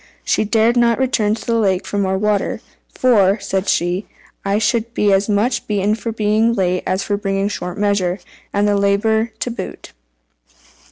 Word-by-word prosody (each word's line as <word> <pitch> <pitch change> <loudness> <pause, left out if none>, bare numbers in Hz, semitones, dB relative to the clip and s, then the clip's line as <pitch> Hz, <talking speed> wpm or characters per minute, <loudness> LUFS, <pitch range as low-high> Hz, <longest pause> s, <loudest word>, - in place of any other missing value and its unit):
She - - +1
dared 225 +3 +2
not 235 -1 +3
return 230 -5 +1
to - - -10
the 230 -1 +1
lake 190 -4 +1
for 205 - -3
more 190 -1 0
water 210 0 0 0.3
"for," 210 -5 +3
said 190 -1 -2
she, 175 +4 0 0.4
"I 200 +1 0
should 230 +2 0
be 205 -1 +3
as 195 +2 +1
much 210 +5 0
beaten 205 0 +1
for 230 +1 -3
being 220 +1 +1
late 185 -3 0
as 190 +1 0
for 205 - -1
bringing 195 0 -1
short 180 -3 -5
measure, 200 -3 0 0.3
and 205 +1 +1
have 205 - +2
the - - 0
labour 220 +3 +2
to 245 - -1
boot." 230 - -7
205 Hz, 180 wpm, -18 LUFS, 195-225 Hz, 0.4 s, not